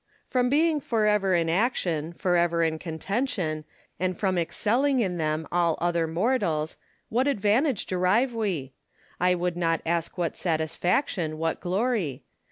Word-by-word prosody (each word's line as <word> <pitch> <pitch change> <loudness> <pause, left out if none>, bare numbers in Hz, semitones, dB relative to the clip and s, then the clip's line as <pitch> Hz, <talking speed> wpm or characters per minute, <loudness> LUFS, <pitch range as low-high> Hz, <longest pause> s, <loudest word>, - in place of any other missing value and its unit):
Lucullus. - - -38
From 250 -1 +2
being 310 +2 +3
for 225 -4 0
ever 200 -3 +3
in 165 -1 +1
action, 170 - 0
for 180 +1 0
ever 170 -1 +2
in 160 -1 0
contention, 165 - -2 0.3
and 185 -1 -1
from 190 -2 0
excelling 240 - +1
in 185 -6 0
them 155 0 -1
all 170 -2 +2
other 170 -1 +1
mortals, 165 -4 0 0.3
what 250 +5 +1
advantage 235 +1 +1
derive 190 +8 +2
we? 180 - -2 0.5
I 180 0 +3
would 175 0 -1
not 165 -2 +1
ask 170 +1 -1
what 170 -3 -1
satisfac 170 - 0
tion, 155 -4 -3
what 165 0 -1
glory? 190 - -1
180 Hz, 155 wpm, -26 LUFS, 165-220 Hz, 0.5 s, being